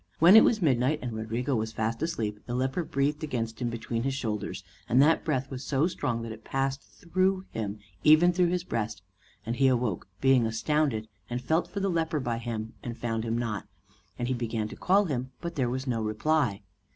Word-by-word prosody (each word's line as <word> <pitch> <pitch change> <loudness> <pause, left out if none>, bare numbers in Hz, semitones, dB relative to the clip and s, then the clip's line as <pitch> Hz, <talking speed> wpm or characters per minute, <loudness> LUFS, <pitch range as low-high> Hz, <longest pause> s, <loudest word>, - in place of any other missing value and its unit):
When 175 +5 +8
it 220 - +10
was 215 -5 +2
midnight 135 0 +3
and 120 -2 -3
Rodrigo 115 +5 -2
was 110 0 -2
fast 115 +2 -2
asleep, 110 -11 -2
the 120 - -2
leper 130 +7 0
breathed 145 +2 -1
against 115 -6 -3
him 120 - 0
between 115 0 -3
his 135 +2 -1
shoulders, 110 -6 -3 0.3
and 125 - +4
that 155 +4 +5
breath 135 -3 -1
was 130 0 -5
so 140 +2 +1
strong 120 -9 -2
that 115 - -5
it 110 0 -10
passed 135 0 -1
through 185 +2 -1
him, 105 -2 -3 0.3
even 160 +4 +6
through 180 0 +3
his 175 0 0
breast; 110 - -3 0.4
and 115 +2 -2
he 135 - +4
awoke, 120 -9 0
being 135 -3 +4
astounded, 115 0 0 0.2
and 120 +1 -2
felt 160 +7 +1
for 200 - -4
the 195 - +1
leper 160 -2 0
by 120 -3 -2
him, 115 -1 -4
and 120 -1 -6
found 115 -2 -2
him 115 0 -1
not; 115 -4 -3 0.5
and 120 - -2
he 130 - +1
began 115 -3 -2
to - - -8
call 200 +3 +3
him, 130 -5 -3
but 170 0 -5
there 130 -6 0
was 130 +2 -3
no 120 -4 -1
reply. 110 0 0
125 Hz, 210 wpm, -28 LUFS, 115-155 Hz, 0.5 s, it